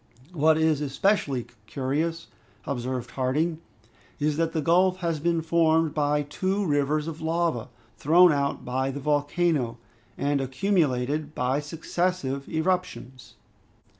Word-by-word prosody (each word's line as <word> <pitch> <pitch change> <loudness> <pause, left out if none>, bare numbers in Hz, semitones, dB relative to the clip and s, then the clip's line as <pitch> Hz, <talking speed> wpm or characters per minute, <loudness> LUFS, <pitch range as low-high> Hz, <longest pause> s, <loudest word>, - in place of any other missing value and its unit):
"What 155 -1 +3
is 160 -2 +2
especially 140 - 0 0.2
curious," 155 +6 -2 0.4
observed 125 -2 -3
Harding, 150 +6 0 0.6
"is 150 0 +1
that 165 0 +1
the 160 - -1
gulf 180 +4 +3
has 165 -3 -1
been 165 +1 0
formed 160 -1 +2
by 150 0 +1
two 190 +7 -1
rivers 150 0 +1
of 160 0 -6
lava, 160 -7 -1 0.3
thrown 175 +4 +6
out 140 -1 -1
by 130 +2 -1
the 140 +1 -5
volcano, 145 -3 0 0.4
and 140 0 0
accumulated 145 -1 0
by 130 +3 0
successive 150 -2 -2
eruptions. 160 -7 -3
150 Hz, 120 wpm, -26 LUFS, 140-165 Hz, 0.6 s, thrown